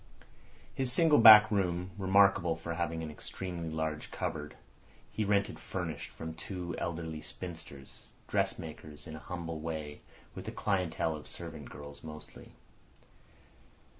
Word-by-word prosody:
His 130 -2 -1
single 155 +2 +5
back 110 -2 +11
room, 90 -3 0
remarkable 95 -3 +4
for 85 - -5
having 80 -1 -2
an 80 - -5
extremely 85 +2 -6
large 80 -1 -3
cupboard, 75 -1 -4 0.6
he 110 - -1
rented 100 -1 +1
furnished - - -4
from 80 0 -7
two 90 +1 -5
elderly 80 -2 -3
spinsters, 80 -7 -10 0.2
dressmakers 75 -1 -3
in 80 -2 -7
a - - -7
humble 85 0 -5
way 75 -2 -5 0.3
with - - -8
a - - -2
clientele 90 -5 0
of 75 - -9
servant 80 -4 -8
girls 70 +1 -10
mostly. 75 -1 -10
85 Hz, 130 wpm, -32 LUFS, 80-95 Hz, 0.6 s, back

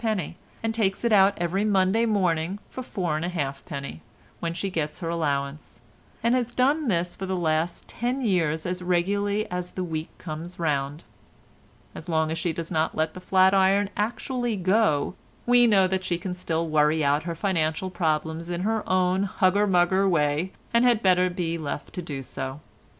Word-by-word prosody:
and 225 0 0
takes 205 -3 0
it 235 -2 +2
out 200 0 +5
every 175 +4 0
Monday 205 +2 +2
morning 180 -3 +1
for 260 - -5
4.5d. 155 - -3 0.4
when 170 - -2
she 190 +3 -3
gets 155 -4 -2
her 165 - -4
allowance, 145 -3 -2 0.4
and 235 +1 +3
has 245 -1 0
done 280 +4 +2
this 175 -4 0
for 190 - -5
the 190 - -1
last 165 -1 -1
ten 250 +3 -2
years 165 -8 +1
as 180 0 -3
regularly 200 +4 0
as 180 0 -3
the 185 - -4
week 160 -2 -4
comes 165 +1 -7
round. 145 -2 -1 0.9
As 165 - -9
long 160 -1 +1
as 165 - -2
she 170 - 0
does 165 +1 -6
not 160 -1 0
let 155 0 0
the - - -8
flat 185 +1 +4
iron 195 +1 +3
actually 240 +2 -1
go 185 -6 +2 0.3
we 245 0 +5
know 195 -4 +5
that 185 0 -1
she 175 -2 -1
can 180 +1 -4
still 165 -2 -2
worry 155 0 +3
out 145 +2 +3
her 170 -1 -3
financial 170 -1 -1
problems 160 -1 -1
in 175 0 -2
her 220 +2 0
own 185 0 +2
hugger 195 +1 +2
mugger 190 +1 +3
way 150 +1 +1 0.2
and 235 +1 +4
had 240 -3 +3
better 185 -1 +4
be 170 -2 -2
left 150 -1 -5
to 180 - -4
do 145 -5 -5
so. 130 +1 -6
180 Hz, 175 wpm, -25 LUFS, 160-195 Hz, 0.9 s, out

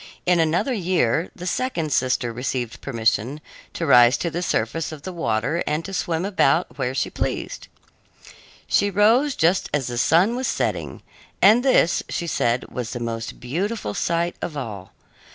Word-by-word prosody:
In 180 -1 +3
another 165 - +1
year 175 - +1
the 180 - -8
second 175 - -1
sister 125 -2 0
received 125 -1 -4
permission 115 +2 0 0.4
to 165 - -2
rise 125 -2 +6
to 170 - -2
the 175 - -3
surface 160 0 -1
of 150 -2 -9
the 185 - -6
water 135 +1 -1
and 150 +2 -1
to 195 - -7
swim 170 -1 -1
about 160 -7 +1
where 130 0 -1
she 120 - -1
pleased. - - -4 1.0
She 205 - +2
rose 225 +8 +3
just 175 +4 +2
as 145 -3 0
the 120 -1 -3
sun 175 - +3
was 255 +1 -2
setting, - - -2 0.4
and 215 +5 +6
this, 255 -10 +3
she 175 - -3
said, 120 -6 0
was 125 -3 -4
the 120 - -4
most 115 -1 -5
beautiful 170 - -3
sight 170 +5 -1
of 150 - -4
all. 105 -8 -6
160 Hz, 165 wpm, -23 LUFS, 125-180 Hz, 1.0 s, rise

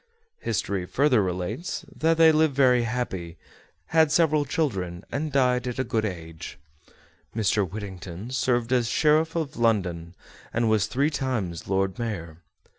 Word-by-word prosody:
History 100 -4 -2
further 135 -2 +3
relates 90 - -3
that 165 +1 +2
they 165 -1 +7
lived 155 -2 +2
very 125 -3 +4
happy, 95 -8 -4 0.5
had 160 -2 +4
several 155 -3 +3
children, 95 - -2
and 150 +1 -2
died 125 -2 +2
at 125 - -4
a 130 - +1
good 115 -3 -1
old 105 - 0
age. 80 -2 -9 0.8
Mr. 105 -3 +1
Whittington 95 +1 -7
served 125 -2 +1
as 120 -2 +2
Sheriff 155 +5 +2
of 160 -7 -3
London 90 -7 0 0.4
and 115 0 +1
was 105 -2 +2
three 140 +4 +1
times 115 - -3
Lord 95 +2 0
Mayor. 85 -9 -4
115 Hz, 145 wpm, -25 LUFS, 95-140 Hz, 0.8 s, they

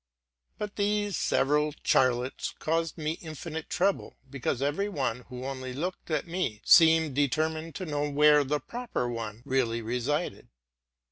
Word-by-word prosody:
But 210 -1 -5
these 205 -1 0
several 150 +2 +1
Charlottes 125 0 +1
caused 165 +1 -1
me 155 +1 -3
infinite 160 0 -6
trouble, 195 +1 0
because 130 -2 -2
every 145 +9 0
one 130 - -2
who 125 0 -7
only 130 -1 -5
looked 175 +8 -4
at 155 -3 0
me 170 - -2
seemed 160 -3 +6
determined 155 +3 0
to 185 - -4
know 145 -2 -1
where 150 0 +5
the 145 +2 -1
proper 240 - -4
one 115 -1 -5
really 115 -3 0
resided. 125 +6 -2
150 Hz, 140 wpm, -28 LUFS, 130-165 Hz, -, seemed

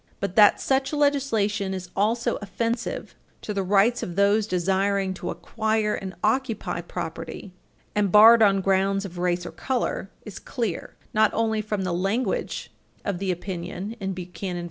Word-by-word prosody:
But 200 -2 -3
that 210 -2 +7
such 270 +2 0
legislation 225 -9 +1
is 185 -1 -7
also 225 +4 +1
offensive 230 - -3 0.3
to 210 - -3
the 200 - -1
rights 205 +5 +3
of 175 - -5
those 200 +2 +3
desiring 190 +1 +1
to 185 - -6
acquire 220 -1 -1
and 190 -1 -5
occupy 215 -6 0
property 170 +2 -6 0.4
and 205 -2 +1
barred 225 +3 +8
on 195 -2 +5
grounds 195 +1 +1
of 180 -2 -8
race 175 0 0
or - - -6
color 250 -6 -2 0.2
is 210 - -8
clear 230 -9 -4 0.2
not 215 0 +4
only 220 -1 +1
from 210 -2 -3
the 185 -2 -1
language 195 +5 -1 0.3
of 195 -4 -2
the 195 -1 -2
opinion 185 +3 -5
in 195 -1 -3
Buchanan 180 +1 -6
v. - - -3
200 Hz, 160 wpm, -25 LUFS, 185-220 Hz, 0.4 s, barred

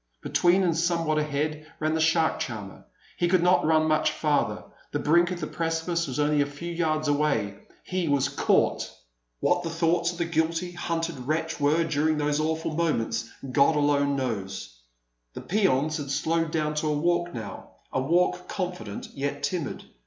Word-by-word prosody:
Between, 180 +2 +3
and 170 -3 +2
somewhat 165 -2 +1
ahead, 150 +1 -2
ran 155 0 0
the 160 - +1
shark 160 0 +2
charmer. 105 - -6 0.3
He 175 - +2
could 175 0 +3
not 180 0 +4
run 155 0 +3
much 155 0 +3
farther; 150 -2 0 0.3
the - - 0
brink 170 +3 +3
of 180 -2 -4
the 155 - -3
precipice 165 +1 -1
was 130 +1 -4
only 150 0 +3
a - - +3
few 145 +4 -7
yards 155 -2 0
away. 145 -9 +1 0.3
He 185 -2 -2
was 140 -2 +2
caught! 140 - +1 0.5
What - - +2
the - - -4
thoughts 170 +1 +1
of 175 - -9
the 170 - 0
guilty, 165 +2 0
hunted 165 -6 -3
wretch 160 +1 -1
were 150 +4 +3
during 155 -1 +1
those 150 0 +1
awful 160 +1 -1
moments, 150 -8 0 0.2
God 140 +4 +4
alone 145 -1 +2
knows. 100 - -4 0.6
The - - -5
peons 155 -6 +1
had 145 -3 -5
slowed 165 +3 0
down 155 -1 -1
to 155 - -1
a 150 -1 +1
walk 175 +2 +1
now 115 -4 -7 0.3
a 130 - +1
walk 175 +5 +1
confident, 180 - -4
yet 145 +1 -3
timid. 145 0 -2
155 Hz, 175 wpm, -26 LUFS, 145-170 Hz, 0.6 s, not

